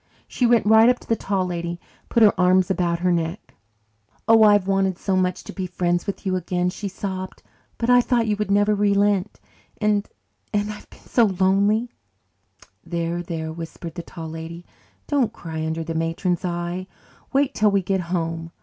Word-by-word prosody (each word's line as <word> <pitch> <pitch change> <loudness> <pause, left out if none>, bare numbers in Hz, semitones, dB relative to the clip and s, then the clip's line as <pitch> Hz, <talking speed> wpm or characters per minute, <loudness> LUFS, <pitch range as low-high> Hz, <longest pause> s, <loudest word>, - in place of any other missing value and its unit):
She 245 - +1
went 235 -3 +3
right 220 +2 +6
up 250 - +3
to - - -16
the 225 - +2
Tall 195 -3 -1
Lady 170 -1 -3
and 175 0 -11
put 230 - +4
her 210 - +7
arms 185 0 +3
about 170 -2 0
her 180 0 +2
neck. 170 +3 -3 0.7
"Oh, 225 0 +6
I've 205 -3 +6
wanted 195 -1 +1
so 190 -1 -1
much 185 -1 0
to - - -9
be 190 -2 -4
friends 175 -1 -1
with 200 - -5
you 185 -1 0
again," 180 0 -1
she 200 +2 -5
sobbed. 190 -1 -6 0.3
"But 235 +1 +1
I 245 0 +7
thought 240 -2 +1
you 210 -1 +1
would 210 -1 -2
never 205 +1 +3
relent 200 -1 +1 0.4
and 210 -1 +1 0.4
and 205 0 -1
I've 210 - -13
been - - -17
so 235 - +3
lonely 200 +4 +2 0.5
" 95 0 -47 0.3
"There, 170 0 -2
there," 160 -2 -5
whispered 165 0 -8
the 175 - -5
Tall 165 -1 -8
Lady, 165 +2 -8 0.4
"don't 270 -7 +1
cry 160 -2 -6
under 160 +1 -2
the 165 0 -4
matron's 165 +3 -1
eye. 175 +1 -3 0.4
Wait 275 0 +2
till 210 0 +3
we 200 -1 +1
get 190 +1 0
home. 165 -1 -3
185 Hz, 190 wpm, -23 LUFS, 170-205 Hz, 0.7 s, her